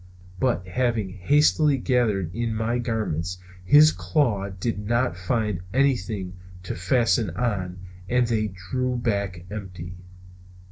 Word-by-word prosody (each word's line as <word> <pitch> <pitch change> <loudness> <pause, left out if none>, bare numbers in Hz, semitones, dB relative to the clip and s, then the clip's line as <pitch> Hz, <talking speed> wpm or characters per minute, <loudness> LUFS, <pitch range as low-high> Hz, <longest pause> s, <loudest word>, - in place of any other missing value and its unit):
But, 120 -8 +1
having 115 -1 0
hastily 145 - +3
gathered 110 - +1
in 115 -1 -2
my 115 +2 0
garments, 100 -7 -2 0.3
his 150 +10 +7
claws 105 -11 0
did 115 +1 -1
not 120 +1 0
find 105 +1 -1 0.2
anything 110 -9 +1 0.3
to 90 - -4
fasten 115 +3 +2
on 95 -7 -1 0.3
and 125 0 +3
they 110 -2 0
drew 105 +7 -3
back 100 -6 -2
empty. 90 -4 -7
110 Hz, 120 wpm, -25 LUFS, 95-125 Hz, 0.3 s, his